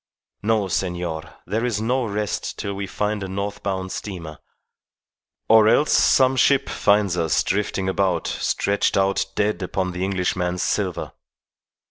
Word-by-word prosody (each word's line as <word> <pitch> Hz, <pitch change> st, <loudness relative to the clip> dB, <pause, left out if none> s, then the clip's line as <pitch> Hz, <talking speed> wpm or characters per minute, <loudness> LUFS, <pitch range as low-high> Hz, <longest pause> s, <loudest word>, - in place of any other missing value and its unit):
No, 110 Hz, -1 st, +1 dB
senor; 85 Hz, -3 st, -3 dB
there 110 Hz, +3 st, -1 dB
is 120 Hz, -4 st, 0 dB
no 125 Hz, +3 st, 0 dB
rest 105 Hz, -1 st, -3 dB
till 100 Hz, -, -3 dB
we 100 Hz, 0 st, -4 dB
find 105 Hz, +1 st, -2 dB
a 95 Hz, -, -4 dB
north 100 Hz, +2 st, -4 dB
bound 95 Hz, -1 st, -3 dB
steamer, 85 Hz, -7 st, -6 dB, 1.1 s
or 110 Hz, -1 st, +6 dB
else 150 Hz, +5 st, +3 dB
some 130 Hz, 0 st, +4 dB
ship 140 Hz, +1 st, +3 dB
finds 100 Hz, -3 st, +2 dB
us 80 Hz, -3 st, +1 dB
drifting 95 Hz, -1 st, -1 dB
about 95 Hz, -3 st, 0 dB
stretched 100 Hz, 0 st, 0 dB
out 95 Hz, 0 st, +2 dB
dead 105 Hz, -2 st, 0 dB
upon 95 Hz, 0 st, -2 dB
the 90 Hz, +1 st, -4 dB
Englishman's 90 Hz, -2 st, -1 dB
silver. -, -, -1 dB
100 Hz, 140 wpm, -22 LUFS, 90-105 Hz, 1.1 s, or